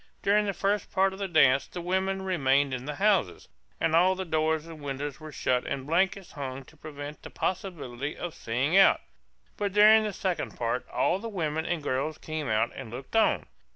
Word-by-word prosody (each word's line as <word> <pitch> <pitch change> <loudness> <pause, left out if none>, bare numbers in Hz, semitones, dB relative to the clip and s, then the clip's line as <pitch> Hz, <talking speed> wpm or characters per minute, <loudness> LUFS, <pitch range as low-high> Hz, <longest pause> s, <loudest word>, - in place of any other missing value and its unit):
During 210 +1 +3
the 200 - 0
first 200 +2 -1
part 190 0 +2
of 190 - -10
the 200 - -2
dance 140 -6 +4
the 180 - -7
women 190 +2 -1
remained 140 -7 +2
in 125 0 -4
the 150 0 -4
houses, 195 - +1 0.3
and 160 - +2
all 185 +3 +5
the 190 0 -4
doors 160 -1 0
and 165 -2 -10
windows 140 0 -4
were 155 -1 -9
shut 125 -3 0
and 135 -1 -3
blankets 190 +4 0
hung 135 -2 -6
to 160 - -18
prevent 145 -1 -8
the - - -9
possibility 150 -8 -4
of 175 -2 -5
seeing 130 +4 -1
out. 195 0 +6 0.6
But 200 -2 -2
during 215 +1 +7
the 215 -1 -2
second 190 -2 -3
part 120 +1 -2
all 185 - +1
the 230 +2 -5
women 160 -5 -2
and 170 -4 -2
girls 140 +5 -1
came 155 -4 -4
out 110 +1 +1
and 130 -4 -8
looked 130 - -8
on. 225 - +3
160 Hz, 200 wpm, -28 LUFS, 135-190 Hz, 0.6 s, during